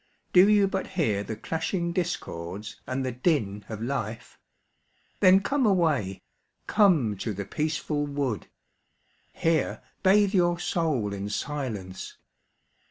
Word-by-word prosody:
Do 185 Hz, +3 st, +7 dB
you 205 Hz, -2 st, +5 dB
but 195 Hz, 0 st, -2 dB
hear 110 Hz, -, +2 dB
the 110 Hz, -, -5 dB
clashing 170 Hz, -, -2 dB
discords 100 Hz, -, -4 dB
and 130 Hz, +1 st, -2 dB
the 130 Hz, -, -1 dB
din 120 Hz, -, 0 dB
of 110 Hz, 0 st, -5 dB
life? 115 Hz, -3 st, -4 dB, 0.8 s
Then 185 Hz, +1 st, +6 dB
come 275 Hz, +6 st, 0 dB
away, 155 Hz, -, +1 dB, 0.4 s
come 160 Hz, -, +3 dB
to 110 Hz, +3 st, -3 dB
the 100 Hz, +1 st, -4 dB
peaceful 150 Hz, +3 st, -2 dB
wood, 140 Hz, -6 st, -2 dB, 0.8 s
Here 165 Hz, -3 st, 0 dB, 0.2 s
bathe 200 Hz, +1 st, +4 dB
your 175 Hz, -2 st, +3 dB
soul 145 Hz, -, -1 dB
in 100 Hz, +1 st, -4 dB
silence. 105 Hz, -8 st, -4 dB
145 Hz, 120 wpm, -27 LUFS, 105-175 Hz, 0.8 s, Do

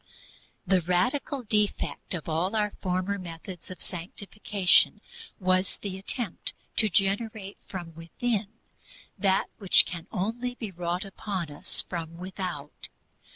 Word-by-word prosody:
The 185 Hz, -1 st, +4 dB
radical 245 Hz, -, +1 dB
defect 210 Hz, -3 st, +1 dB
of 165 Hz, -, -5 dB
all 170 Hz, +6 st, +1 dB
our 210 Hz, -1 st, +2 dB
former 185 Hz, +2 st, 0 dB
methods 175 Hz, +1 st, -7 dB
of 185 Hz, -, -6 dB
sanctification 195 Hz, +2 st, +3 dB, 0.4 s
was 185 Hz, 0 st, +2 dB
the 195 Hz, -2 st, -2 dB
attempt 205 Hz, 0 st, -2 dB, 0.2 s
to 215 Hz, -, +7 dB
generate 200 Hz, +2 st, +1 dB
from 175 Hz, -4 st, -6 dB
within 200 Hz, +6 st, -1 dB, 0.7 s
that 195 Hz, -2 st, +3 dB
which 195 Hz, -3 st, +6 dB
can 175 Hz, -1 st, -6 dB
only 240 Hz, +6 st, -1 dB
be 220 Hz, -5 st, -5 dB
wrought 175 Hz, +2 st, -2 dB
upon 195 Hz, -4 st, -3 dB
us 145 Hz, -, -1 dB
from 165 Hz, -2 st, -4 dB
without. 180 Hz, -5 st, -5 dB
190 Hz, 120 wpm, -28 LUFS, 175-210 Hz, 0.7 s, to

